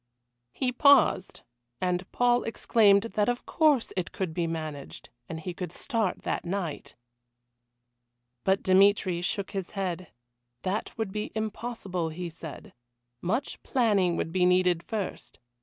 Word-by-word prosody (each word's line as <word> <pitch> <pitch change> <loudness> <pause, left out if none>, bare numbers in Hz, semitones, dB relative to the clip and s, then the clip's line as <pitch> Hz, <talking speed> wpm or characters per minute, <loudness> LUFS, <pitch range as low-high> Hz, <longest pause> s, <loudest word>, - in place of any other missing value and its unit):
He 255 - -1
paused, 280 -7 +4 0.4
and 180 0 -1
Paul 245 0 +3
exclaimed 210 -3 +4
that 210 +1 +2
of 245 0 -2
course 300 -7 +2
it 185 -3 -2
could 185 -4 -3
be 170 0 -1
managed, 155 -3 -6 0.2
and 160 - -5
he 180 +2 -5
could 180 0 -5
start 225 -8 -2
that - - -2
night. 175 -4 -4 1.5
But 190 0 +2
Dmitry 190 -2 +4
shook 195 +2 -2
his 190 -3 -5
head. 185 -2 -2 0.6
That 200 +5 -2
would 220 -4 -2
be 210 +1 -4
impossible, 215 -5 -3
he 170 +2 -5
said. 160 -2 -9 0.5
Much 230 +10 -2
planning 205 -9 +2
would 165 - -2
be 185 +1 +1
needed 180 -1 +4
first. 205 +1 -5
190 Hz, 135 wpm, -28 LUFS, 175-220 Hz, 1.5 s, paused